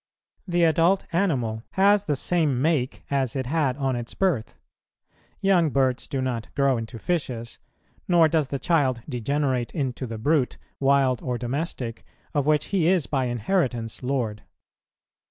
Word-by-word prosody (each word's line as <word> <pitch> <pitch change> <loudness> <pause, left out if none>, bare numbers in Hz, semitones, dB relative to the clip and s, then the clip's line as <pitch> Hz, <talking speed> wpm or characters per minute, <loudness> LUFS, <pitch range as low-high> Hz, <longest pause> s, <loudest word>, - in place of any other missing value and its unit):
The 175 -1 +2
adult 170 +4 +3
animal 130 - 0
has 200 +1 +4
the 150 - 0
same 150 -3 +1
make, 140 -3 0
as 135 -3 0
it 130 -1 -1
had 140 -2 0
on 135 -3 0
its 120 -1 -6
birth; 165 - 0 0.9
young 185 -5 +4
birds 130 -2 +1
do 135 -3 -2
not 120 -4 -2
grow 140 -2 +3
into 115 +1 -6
fishes, 125 -6 -3 0.5
nor 170 -3 +5
does 155 -3 +1
the 140 - -3
child 135 -6 +1
degenerate 130 -1 -1
into 130 -4 -2
the 115 -1 -5
brute, 140 +3 +1 0.2
wild 135 -3 +3
or 125 -2 -2
domestic, 125 -2 -4 0.3
of 145 -2 0
which 150 -1 +3
he 175 -5 +3
is 180 -5 +3
by 135 -3 0
inheritance 120 - -1
lord. 125 -6 -2
135 Hz, 150 wpm, -25 LUFS, 125-160 Hz, 0.9 s, nor